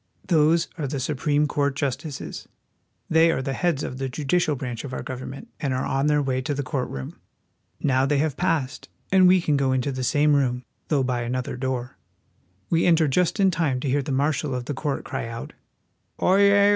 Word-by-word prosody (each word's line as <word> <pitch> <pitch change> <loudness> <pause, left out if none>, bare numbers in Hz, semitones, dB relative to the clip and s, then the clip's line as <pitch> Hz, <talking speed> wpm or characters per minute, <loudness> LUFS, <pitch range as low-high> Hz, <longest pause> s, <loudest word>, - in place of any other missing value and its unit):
Those 165 -1 +3
are 145 - -1
the 140 +1 -3
Supreme 145 +2 +1
Court 140 -1 0
justices. 140 0 -4 0.6
They 160 +1 +5
are 130 - 0
the 135 - -2
heads 165 -2 0
of 130 - -5
the 135 -1 -2
judi 145 +5 0
cial 155 -5 +1
branch 125 -3 -5
of 135 -2 -7
our - - -4
government, 130 - -7
and 135 -4 -1
are 130 - -1
on 135 +2 0
their 150 -1 +3
way 130 -1 0
to 145 +3 -2
the 140 - -2
court 130 0 -2
room. 65 -1 -7 0.6
Now 135 -1 +2
they 145 0 +2
have 150 0 0
passed, 160 -7 -1 0.2
and 185 -1 +6
we 185 +1 +6
can 150 -4 +1
go 135 -1 +1
into 130 +2 0
the 130 -1 -4
same 145 +3 +3
room, 125 -3 +1 0.2
though 145 -4 +2
by 125 -1 -1
another 125 +2 -3
door. 130 -1 -3 0.7
We 165 +1 +3
enter 165 -2 +4
just 180 +8 +1
in 195 -1 +4
time 155 -7 0
to 145 - -3
hear 140 +2 +2
the 140 - -5
marshal 140 0 0
of 125 -1 -4
the 145 - -3
court 140 +1 -3
cry - - -4
out: 115 0 -7 0.3
" - - -42
Oyez 200 +1 +5
140 Hz, 210 wpm, -24 LUFS, 130-155 Hz, 0.7 s, and